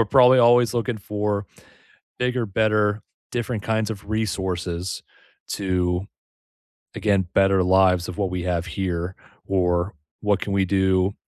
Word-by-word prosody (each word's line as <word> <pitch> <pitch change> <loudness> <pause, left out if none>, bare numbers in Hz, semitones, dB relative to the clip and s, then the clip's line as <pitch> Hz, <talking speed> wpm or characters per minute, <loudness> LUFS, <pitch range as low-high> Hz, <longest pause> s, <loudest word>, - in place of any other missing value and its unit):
we're - - +5
probably 130 +2 +6
always 120 -1 +5
looking 120 -1 -1
for 105 0 -2 0.7
bigger, 125 -1 0
better, 105 0 +1 0.3
different 120 -3 -3
kinds 110 -1 0
of 100 -1 -7
resources 95 -4 -2 0.5
to, 90 -1 -1 0.9
again, 100 -4 +1
better 95 -1 +4
lives 90 -1 +3
of 90 - -7
what 100 -2 0
we 90 -1 -3
have 85 -2 -1
here 90 0 -3 0.3
or 90 0 0 0.3
what 105 -2 +1
can 100 - -3
we 95 -1 +2
do 95 0 +2
100 Hz, 135 wpm, -23 LUFS, 90-110 Hz, 0.9 s, probably